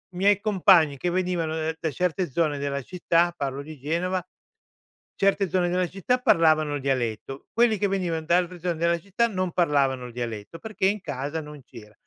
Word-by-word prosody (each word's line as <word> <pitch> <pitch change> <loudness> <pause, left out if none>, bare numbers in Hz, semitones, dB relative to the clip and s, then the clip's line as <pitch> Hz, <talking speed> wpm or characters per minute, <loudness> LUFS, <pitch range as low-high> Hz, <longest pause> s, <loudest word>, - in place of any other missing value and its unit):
miei 200 +2 +3
compagni 185 -8 +4
che 175 - -1
venivano 175 -3 -1 0.2
da 160 - -2
certe 180 +3 -1
zone 155 0 0
della 140 0 -2
città- 175 +1 +1
parlo 140 -1 -3
di 155 +1 -10
Genova- 175 +6 -2 0.9
certe 195 -1 +2
zone 175 0 +1
della 180 0 0
città, 195 +8 -1
parlavano 155 -8 +3
il 145 - -4
dialetto. 130 0 -3
Quelli 230 -2 +3
che 205 - +2
venivano 180 -5 -1
da 170 +2 +4
altre 180 0 -2
zone 175 0 -2
della 170 +1 +1
città 200 +6 0
non 185 -4 -2
parlavano 140 -6 +1
il 120 - -12
dialetto 115 +3 -6
perché 215 -1 -1
in 205 +1 0
casa 145 0 -4
non 150 -1 -11
c’era. 110 -4 -14
170 Hz, 180 wpm, -25 LUFS, 145-185 Hz, 0.9 s, compagni